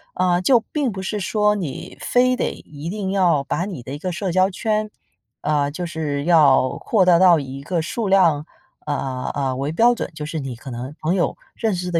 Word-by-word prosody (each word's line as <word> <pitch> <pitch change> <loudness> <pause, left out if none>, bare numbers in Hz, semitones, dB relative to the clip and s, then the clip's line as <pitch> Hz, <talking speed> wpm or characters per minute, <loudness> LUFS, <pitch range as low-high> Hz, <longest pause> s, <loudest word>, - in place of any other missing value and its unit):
啊， 180 -1 +2
就 245 +5 +5
并 285 -5 0
不 190 -1 -6
是 210 +2 -2
说 210 +1 +2
你 175 -10 -5
非 255 +1 +3
得 - - -1
一 150 +2 -9
定 195 -1 -3
要 175 -7 +2
把 175 +5 -2
你 180 -11 -7
的 135 +3 -7
一 145 - -6
个 185 +2 -3
社 185 +1 -3
交 185 +2 +3
圈 215 +2 -1 0.5
呃， 145 -1 +1
就 175 +4 -4
是 150 -4 -3
要 145 -6 +4
扩大 185 -6 +4
到 180 -3 +6
一 135 -1 -7
个 170 +2 -1
数 220 +6 -3
量， 170 -6 +3 0.4
啊， 135 -3 -3
呃， 135 -2 -1
为 140 +3 -2
标 235 +9 +4
准， - - -4
就 150 -1 -5
是 160 +1 -4
你 135 -4 -5
可 130 +3 -10
能 125 +4 -6
朋 160 +3 +1
友 180 - 0 0.2
认 220 -4 0
识 180 0 -4
得 165 - +2
170 Hz, 230 characters per minute, -21 LUFS, 145-195 Hz, 0.5 s, 到